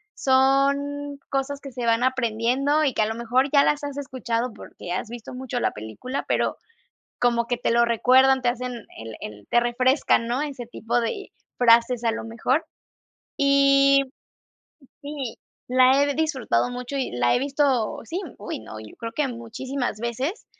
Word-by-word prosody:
son 280 +2 +2
cosas 275 +1 -2
que 275 - -9
se 245 -1 -4
van 230 +1 +2
aprendiendo 260 +4 +1
y 275 -4 +1
que - - 0
a - - +3
lo 220 - -3
mejor 245 +4 +1
ya 280 -1 +6
las 295 0 +1
has 285 -1 -5
escuchado 250 -4 -3
porque 175 - -10
has 185 +5 -3
visto 240 0 -8
mucho 250 -1 -4
la - - +1
película, 110 - -6
pero - - 0 0.6
como 235 -1 +2
que 245 0 -1
te - - -1
lo 235 +1 +4
recuerdan, 260 +3 +4
te 245 - +2
hacen 250 +1 -2 0.2
el 110 0 -8
el 105 -1 -9
te 240 - +4
refrescan, 240 0 +2
¿no? 245 +3 0
Ese 275 -5 -5
tipo 235 0 -1
de 395 - -4 0.3
frases, 235 0 +4
a 230 - +2
lo 225 - -5
mejor. 245 +6 0 0.7
Y, 275 0 +5 1.0
sí, 285 -5 -6 0.3
la 255 +2 +5
he 285 0 0
disfrutado 265 - 0
mucho 250 +2 -5
y 265 - -1
la 120 0 +2
he - - +2
visto, 275 -4 0
sí, 335 +10 -4 0.2
uy, 205 - -6
no, 110 0 -9
yo 110 -1 -12
creo 230 0 -5
que 295 +3 0
muchísimas 245 0 -4
veces. 255 - -3
250 Hz, 170 wpm, -24 LUFS, 230-275 Hz, 1.0 s, ya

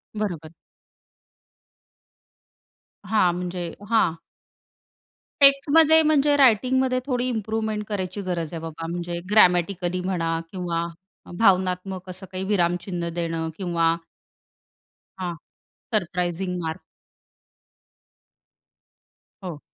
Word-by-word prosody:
बरोबर. 170 -7 -4 2.5
हां, 185 -5 +3
म्हणजे 175 -1 -4 0.2
हां. 180 -8 +3 1.3
टेक्स्टमध्ये 295 +3 +6
म्हणजे 295 -2 +3
रायटिंगमध्ये 255 +1 +3
थोडी 250 -2 -1
इम्प्रूव्हमेंट 220 -2 -2
करायची 200 -1 -3
गरज 175 -3 -3
आहे 165 - -4
बाबा, 165 0 -6
म्हणजे 170 0 -4
ग्रॅमॅटिकली 180 -2 +3
म्हणा 165 -3 -1
किंवा 170 -3 -2 0.5
भावनात्मक 185 -2 +1
असं 185 +1 -7
काही 185 0 -3
विरामचिन्ह 175 -2 -1
देणं 165 -1 -2
किंवा 170 -3 +1 1.2
हां. 175 -2 -3 0.6
Surprising 180 -1 -1
mark. 160 +2 -4 2.6
हो. 170 -5 -6
185 Hz, 80 wpm, -24 LUFS, 170-215 Hz, 2.6 s, टेक्स्टमध्ये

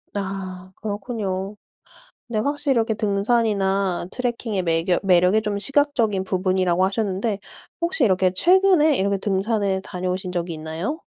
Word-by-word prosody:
아 190 -2 -5
그렇군요. 205 -2 -4 0.7
근데 235 -3 -2
확실히 285 +3 0
이렇게 230 -3 +1
등산이나 200 -3 +1
트래킹의 235 -5 -2
매겨 170 +1 +1
매력이 185 +2 +4
좀 210 -1 -2
시각적인 235 -6 +1
부분이라고 185 -1 +1
하셨는데 200 +1 -1 0.4
혹시 340 -5 +1
이렇게 185 -3 +3
최근에 355 - +4
이렇게 200 -1 +1
등산을 195 0 0
다녀오신 185 0 -4
적이 175 -1 -3
있나요? 160 - -4
200 Hz, 340 characters per minute, -22 LUFS, 185-230 Hz, 0.7 s, 매력이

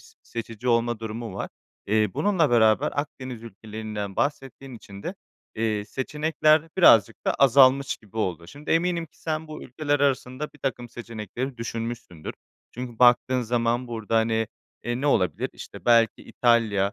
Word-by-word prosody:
s - - -19
seçici 115 +1 -6
olma 115 -1 +2
durumu 115 +1 -5
var. - - -4 0.4
Eee, 105 0 +2
bununla 185 -8 +2
beraber 110 -2 +4
Akdeniz 130 -5 -5
ülkelerinden 110 -2 -6
bahsettiğin 135 -2 -3
için 100 -3 -11
de, - - -4 0.4
eee, 110 -2 -1
seçenekler 155 +5 +1 0.2
birazcık 115 - +6
da - - +2
azalmış 135 0 +5
gibi 110 0 -18
oldu. 85 -6 -2
Şimdi 145 - -9
eminim 170 0 +1
ki - - -29
sen 160 0 -3
bu 155 - -8
ülkeler 145 +2 -1
arasında 135 0 0
bir - - -17
takım 125 -3 -3
seçenekleri 120 +2 -6
düşünmüşsündür. 115 -7 -5 0.4
Çünkü 120 -2 -7
baktığın 125 +1 +5
zaman 120 +1 0
burada, 115 -1 -2
hani, 110 0 +2 0.4
eee, 120 +1 -2
ne 145 - -1
olabilir? 95 -10 +1
İşte - - -11
belki 115 -2 +5
İtalya, 110 -5 +2
120 Hz, 150 wpm, -25 LUFS, 110-135 Hz, 0.4 s, birazcık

